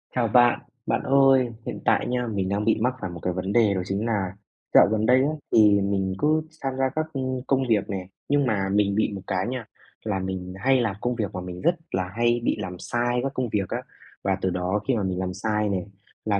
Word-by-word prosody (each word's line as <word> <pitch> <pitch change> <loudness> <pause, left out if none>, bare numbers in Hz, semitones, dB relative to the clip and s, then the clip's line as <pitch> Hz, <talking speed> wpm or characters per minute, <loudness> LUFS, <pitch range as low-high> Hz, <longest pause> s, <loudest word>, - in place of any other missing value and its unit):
Chào 120 -2 +2
bạn, 120 +2 +5 0.3
bạn - - 0
ơi, 135 -1 +5 0.2
hiện - - -5
tại - - +3
nha, 125 0 -1
mình 100 -4 -2
đang 100 +1 -1
bị 110 - +4
mắc 125 +2 +2
phải 95 - -3
một 85 - -8
cái 90 - -2
vấn 95 +2 -3
đề 110 -4 +4
đó 95 - -1
chính 100 +4 -2
nà 95 -5 -1 0.4
dạo - - +8
gần 110 0 +1
đây 125 +2 +5
á 145 - +2 0.2
thì 105 -2 +6
mình 95 -1 0
cứ 155 +1 +3
sam 135 -4 -4
gia 135 0 +2
các 155 0 0
công 130 -2 -2
công 135 -1 +2
việc 105 -3 +2
nè, 95 -2 -4 0.2
nhưng 145 -1 +3
mà 100 -5 0
mình 100 0 +2
bị 110 - +1
một 95 - -6
cái 95 -1 -1
nha, 125 -2 -4 0.4
là 100 -3 -1
mình 95 -1 -4
hay 130 +4 +3
làm 105 -4 -1
công 125 0 -1
việc 105 -3 -3
mà 90 - -4
mình 90 0 -7
rất 170 - +3 0.2
là 90 -1 -1
hay 120 0 +2
bị - - +1
làm 90 -1 -5
sai 120 +1 -1
các 135 0 -2
công 130 -3 -2
việc 100 -4 -1
á. - - -2 0.4
Và 95 -1 +1
từ 95 - +1
đó 90 +3 -1
khi 130 - +2
mà 105 - -1
mình 95 -1 -2
làm 95 0 -2
sai 105 +2 -1
nè 95 -3 -1 0.4
là 100 -2 +1
105 Hz, 250 wpm, -25 LUFS, 95-125 Hz, 0.4 s, dạo